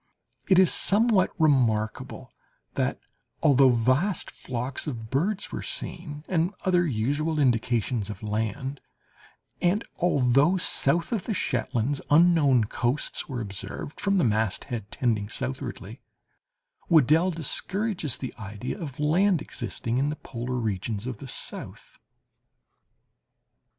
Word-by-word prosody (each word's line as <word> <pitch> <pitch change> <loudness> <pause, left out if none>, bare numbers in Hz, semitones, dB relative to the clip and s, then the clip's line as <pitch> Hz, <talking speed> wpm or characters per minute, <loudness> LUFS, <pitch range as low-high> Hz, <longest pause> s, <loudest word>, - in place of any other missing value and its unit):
It 190 - +5
is 185 -1 +6
somewhat 210 -2 +4
remarkable 120 -8 +1 0.4
that, - - -1 0.4
although 135 -3 +6
vast 130 - +1
flocks 125 +3 -4
of 115 -6 -5
birds 185 +10 -1
were - - -4
seen, 150 -1 -6
and 180 +2 0
other 180 -2 +3
usual 145 +6 -1
indications 120 -4 +1
of 105 0 -7
land, 110 +6 -3 0.8
and 185 +5 +2 0.2
although, 145 +1 +3
south 170 - +2
of 225 -5 -1
the 220 - -2
Shetlands, 125 -2 -1
unknown 150 -6 +5
coasts 120 +6 -2
were 125 -3 -3
observed 100 +7 -7
from 200 0 +1
the 185 - +3
masthead 110 -1 -1
tending 110 -5 -1
southwardly, 125 -3 -5 0.9
Weddell 160 +2 +5
discourages 180 - -1
the 130 - -6
idea 105 - -6
of 140 -5 -6
land 175 +5 +3
existing 120 -2 -3
in 140 +2 +1
the 150 - -3
polar 125 -3 -5
regions 110 -2 -2
of 130 -4 -5
the 140 - -8
south. - - -7
135 Hz, 120 wpm, -26 LUFS, 115-170 Hz, 0.9 s, is